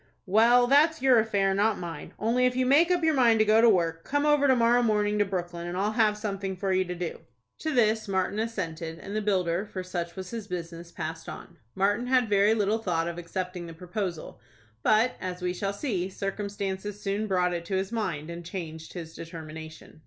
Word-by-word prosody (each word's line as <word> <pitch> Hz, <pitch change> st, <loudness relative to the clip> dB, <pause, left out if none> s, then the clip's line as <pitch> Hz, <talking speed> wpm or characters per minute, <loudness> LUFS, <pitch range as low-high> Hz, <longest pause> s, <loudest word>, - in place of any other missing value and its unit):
"Well, 230 Hz, +5 st, +5 dB
that's 295 Hz, +3 st, +4 dB
your 255 Hz, -3 st, +6 dB
affair, 200 Hz, -3 st, +1 dB
not 205 Hz, +2 st, +2 dB
mine. 165 Hz, -4 st, -7 dB
Only, 245 Hz, +4 st, +2 dB
if 250 Hz, -, -2 dB
you 255 Hz, 0 st, +1 dB
make 295 Hz, +7 st, +5 dB
up 355 Hz, -2 st, +1 dB
your 320 Hz, -1 st, +3 dB
mind 240 Hz, -5 st, +4 dB
to 215 Hz, -, +4 dB
go 215 Hz, +1 st, +5 dB
to 235 Hz, -, +7 dB
work, 165 Hz, -4 st, +1 dB
come 290 Hz, +1 st, 0 dB
over 295 Hz, -1 st, +4 dB
to 260 Hz, -, +5 dB
morrow 240 Hz, 0 st, +4 dB
morning 210 Hz, -2 st, +1 dB
to 205 Hz, -, +4 dB
Brooklyn, 175 Hz, -3 st, -4 dB
and 175 Hz, +1 st, -4 dB
I'll 205 Hz, +3 st, +1 dB
have 215 Hz, -2 st, +2 dB
something 195 Hz, -3 st, -4 dB
for 190 Hz, +1 st, 0 dB
you 185 Hz, 0 st, +3 dB
to 180 Hz, 0 st, -5 dB
do." 175 Hz, -1 st, -4 dB, 0.4 s
To 315 Hz, -, -2 dB
this 220 Hz, -4 st, +2 dB
Martin 190 Hz, +1 st, -1 dB
assented, 165 Hz, -7 st, -4 dB
and 200 Hz, +4 st, -7 dB
the 215 Hz, -, 0 dB
builder, 185 Hz, -3 st, 0 dB
for 190 Hz, -3 st, -6 dB
such 175 Hz, -2 st, -4 dB
was 185 Hz, -1 st, -7 dB
his 225 Hz, -3 st, -6 dB
business, 170 Hz, -2 st, -6 dB
passed 160 Hz, 0 st, -6 dB
on. -, -, -10 dB, 0.2 s
Martin 205 Hz, +5 st, +1 dB
had 250 Hz, -3 st, +3 dB
very 205 Hz, +2 st, +4 dB
little 215 Hz, +1 st, +1 dB
thought 170 Hz, -6 st, -1 dB
of 170 Hz, 0 st, -4 dB
accepting 180 Hz, 0 st, -5 dB
the 165 Hz, -, -9 dB
proposal; 180 Hz, -1 st, -5 dB, 0.4 s
but, 220 Hz, -, +3 dB
as 180 Hz, -1 st, -5 dB
we 180 Hz, 0 st, 0 dB
shall 195 Hz, +2 st, -2 dB
see, 200 Hz, -5 st, -2 dB
circumstances 200 Hz, 0 st, -4 dB
soon 205 Hz, +2 st, -2 dB
brought 180 Hz, -2 st, +1 dB
it 170 Hz, -1 st, -3 dB
to 190 Hz, -, -2 dB
his 190 Hz, +2 st, -1 dB
mind, 170 Hz, -9 st, -3 dB
and 170 Hz, 0 st, -7 dB
changed 160 Hz, -3 st, -7 dB
his 165 Hz, -3 st, -7 dB
determination. 160 Hz, -2 st, -9 dB
195 Hz, 210 wpm, -27 LUFS, 175-225 Hz, 0.4 s, to